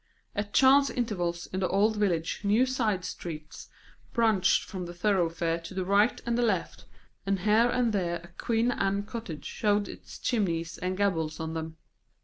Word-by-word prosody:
At 205 0 -3
chance 275 +3 +6
intervals 175 -8 -2
in 185 - -1
the 185 - +1
old 210 +4 +2
village 175 -6 0
new 210 +5 +4
side 225 -8 0
streets 155 -3 -7 0.4
branched 220 -6 +3
from 185 -3 -5
the 175 - -8
thoroughfare 170 -3 +1
to 165 +3 -10
the 185 -1 -1
right 205 +4 +3
and 235 - 0
the 240 - +1
left, 210 -7 -1 0.4
and 195 0 -1
here 215 +4 +4
and 240 -2 +1
there 175 -4 0
a 170 - -13
Queen 230 +6 0
Anne 200 -3 0
cottage 205 -8 -7
showed 205 -1 0
its - - -10
chimneys 170 -8 -1
and 185 +1 -2
gables 165 -6 0
on 160 0 -4
them. 160 0 -5
195 Hz, 170 wpm, -28 LUFS, 170-220 Hz, 0.4 s, chance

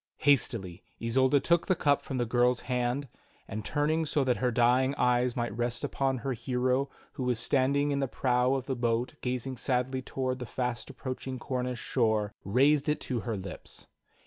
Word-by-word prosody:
Hastily 115 -10 +2 0.2
Isolda 130 +4 +3
took 170 +4 +2
the 185 - +3
cup 145 -3 +2
from 135 - -5
the 120 - +1
girl's 120 +1 +2
hand, 125 +2 -1 0.4
and 110 +1 -5
turning 155 +2 +1
so 150 -2 +1
that 125 -2 +1
her 125 - +1
dying 125 +3 +3
e^^es 125 -1 +2
might 120 -3 -2
rest 120 0 -2
upon 135 -1 0
her 130 +3 -2
hero 125 +3 0 0.2
who 130 - -5
was 125 -2 +1
standing 140 +4 +2
in 140 - 0
the 135 - 0
prow 125 +1 +1
of 130 -2 -3
the 135 - -2
boat 120 0 0
gazing 125 +1 -3
sadly 130 +1 0
toward 130 0 -3
the 125 - -5
fast 125 -1 -3
approaching 130 0 -5
Cornish 125 -1 -3
shore, 110 -4 0
raised 140 +7 +3
it 150 - +1
to 125 -3 -2
her 115 -1 -3
lips. 95 -1 -9
125 Hz, 180 wpm, -29 LUFS, 120-135 Hz, 0.4 s, Isolda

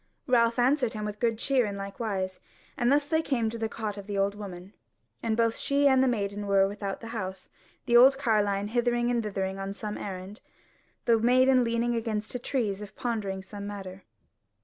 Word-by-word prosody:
Ralph 235 -2 +3
answered 250 -1 +2
him 215 -1 -4
with 210 0 -5
good 230 -2 +1
cheer 255 -1 +2
in 200 - -4
likewise; 195 -2 -3 0.4
and 240 +1 +2
thus 285 0 +3
they 315 +2 +1
came 235 -7 0
to 230 - -5
the 225 0 -1
cot 210 -2 -4
of 200 - -10
the 205 -1 -3
old 195 +1 +1
woman, 195 -2 -9 0.5
and 225 -1 -1
both 230 -1 +2
she 280 0 +2
and 265 -1 +5
the - - +3
maiden 205 -3 -2
were 195 -1 +4
without 200 -1 -5
the 230 - -7
house, 190 -5 -5 0.3
the 240 -2 +2
old 265 +3 +8
carline 210 -5 +1
hithering 240 +1 +1
and 240 -1 +1
thithering 195 -2 -3
on 195 +1 -4
some 210 -1 -5
errand, 195 +3 -7 0.6
the 230 -1 +4
maiden 255 +2 +4
leaning 235 +1 0
against 220 -2 -2
a 250 - -3
tree 240 -4 -1
as 195 +1 -7
if 205 - -9
pondering 210 -7 -3
some 200 +1 -8
matter. 195 -2 -7
220 Hz, 200 wpm, -28 LUFS, 200-240 Hz, 0.6 s, old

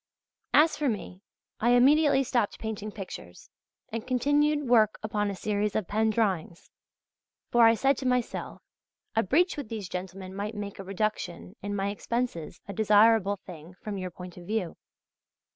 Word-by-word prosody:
As 315 +2 +6
for 295 -2 0
me, 190 -3 -5 0.4
I 240 +2 +3
immediately 280 +2 +5
stopped 240 -5 0
painting 215 -1 -5
pictures, 185 - -9 0.4
and 225 0 -5
continued 290 +3 +2
work 220 -3 +4
upon 210 -1 -1
a 200 - -4
series 210 +1 -1
of 215 -5 -1
pen 220 +1 +1
drawings; 195 -6 -1 0.8
for, 235 -1 +7
I 225 - +5
said 270 +3 +2
to 260 - -2
myself, 250 -2 -2 0.5
a 225 - +4
breach 330 - +2
with 280 -7 -5
these 215 -4 -5
gentlemen 185 +1 -6
might 205 +3 -4
make 205 -1 -6
a - - -5
reduction 195 -1 -3
in 205 0 -3
my 195 0 0
expenses 205 -6 -3
a 200 - -5
desirable 215 -1 +4
thing 170 0 -11
from 200 +1 -6
your 185 -1 -4
point 180 0 -10
of 175 -1 -11
view. 210 -6 -2
215 Hz, 160 wpm, -28 LUFS, 195-240 Hz, 0.8 s, for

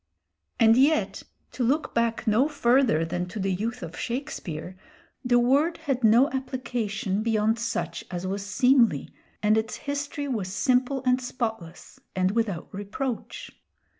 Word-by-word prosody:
And 225 +1 +6
yet 295 +4 +2 0.3
to 255 - -3
look 280 +7 0
back 230 0 0
no 225 +5 +3
further 250 - +2
than 180 +2 -3
to 210 +4 -7
the 195 0 0
youth 225 +4 -3
of 165 0 -7
Shakespeare, 190 - -5 0.5
the 245 -1 +3
word 280 +8 +3
had 260 -3 -2
no 230 +5 +6
application 230 -6 -2
beyond 220 0 +1
such 230 0 -3
as 180 0 -4
was 195 +1 -3
seemly, 230 - +3 0.3
and 215 +1 +4
its 220 0 -4
history 285 0 -4
was 210 -8 -2
simple 255 +4 +1
and 255 0 +3
spotless 225 -9 -5 0.2
and 185 0 +2
without 205 -6 -1
reproach. 210 +5 -5
230 Hz, 140 wpm, -26 LUFS, 200-260 Hz, 0.5 s, And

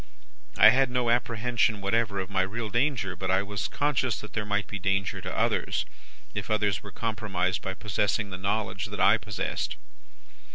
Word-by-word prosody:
I 110 - +10
had 130 +2 +3
no 125 -1 +1
apprehension 120 -2 +1
whatever 100 +1 0
of 95 - -3
my 95 -1 +2
real 105 +4 -3
danger; 120 -7 +1
but 95 +2 -4
I 95 +1 +3
was 100 -1 -3
conscious 135 -5 0
that 105 - -10
there 105 -2 -2
might 100 0 0
be 100 - -6
danger 95 0 0
for - - -5
others, - - 0 0.5
if - - -4
others 105 -3 +1
were 100 - -10
compromised 100 -6 -1
by 95 0 -4
possessing 105 0 -1
the 95 - -4
knowledge 100 +3 -1
that - - -7
I - - +5
possessed. - - -3
105 Hz, 175 wpm, -28 LUFS, 95-115 Hz, 0.5 s, I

